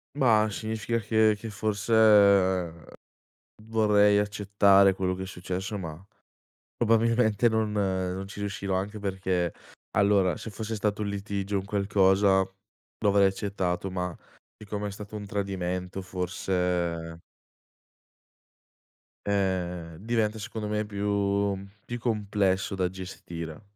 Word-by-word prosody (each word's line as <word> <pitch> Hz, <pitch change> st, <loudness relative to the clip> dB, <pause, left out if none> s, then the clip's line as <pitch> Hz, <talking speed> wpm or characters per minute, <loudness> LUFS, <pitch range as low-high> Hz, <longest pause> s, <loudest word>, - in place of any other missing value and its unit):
Mah, 110 Hz, -6 st, +4 dB
significa 110 Hz, +2 st, -2 dB
che 110 Hz, 0 st, +3 dB
che 115 Hz, -, -6 dB
forse 105 Hz, +1 st, -2 dB, 1.7 s
vorrei 105 Hz, -2 st, +4 dB
accettare 100 Hz, -1 st, +4 dB
quello 95 Hz, -1 st, -1 dB
che 95 Hz, -, -5 dB
è -, -, -5 dB
successo 95 Hz, +3 st, -4 dB
ma 80 Hz, -4 st, -6 dB, 0.8 s
probabilmente 115 Hz, -1 st, +3 dB
non 110 Hz, -1 st, 0 dB
non 95 Hz, -1 st, -1 dB
ci 100 Hz, -, -10 dB
riuscirò, 100 Hz, -1 st, -2 dB
anche 105 Hz, +2 st, -3 dB
perché, 95 Hz, -3 st, -1 dB, 0.4 s
allora 100 Hz, -4 st, +3 dB
se 110 Hz, -, -7 dB
fosse 110 Hz, +1 st, -4 dB
stato 105 Hz, 0 st, -1 dB
un 100 Hz, -, -2 dB
litigio, 100 Hz, 0 st, -2 dB
un 95 Hz, -, -5 dB
qualcosa, 100 Hz, -1 st, +3 dB
lo 95 Hz, +2 st, -5 dB
avrei 100 Hz, 0 st, +5 dB
accettato 95 Hz, -2 st, -2 dB
ma 90 Hz, -2 st, -3 dB, 0.4 s
siccome 105 Hz, -1 st, -5 dB
è -, -, -3 dB
stato 105 Hz, +1 st, -8 dB
un 105 Hz, -1 st, -6 dB
tradimento 95 Hz, -2 st, -3 dB
forse 90 Hz, -2 st, -2 dB, 2.1 s
Eh, 90 Hz, -4 st, -1 dB
diventa 110 Hz, 0 st, 0 dB
secondo 105 Hz, +2 st, -5 dB
me 105 Hz, 0 st, -1 dB
più 100 Hz, -1 st, 0 dB, 0.3 s
più 120 Hz, 0 st, -5 dB
complesso 100 Hz, -5 st, 0 dB
da 95 Hz, -2 st, 0 dB
gestire. 85 Hz, -3 st, -8 dB
100 Hz, 115 wpm, -27 LUFS, 95-105 Hz, 2.1 s, avrei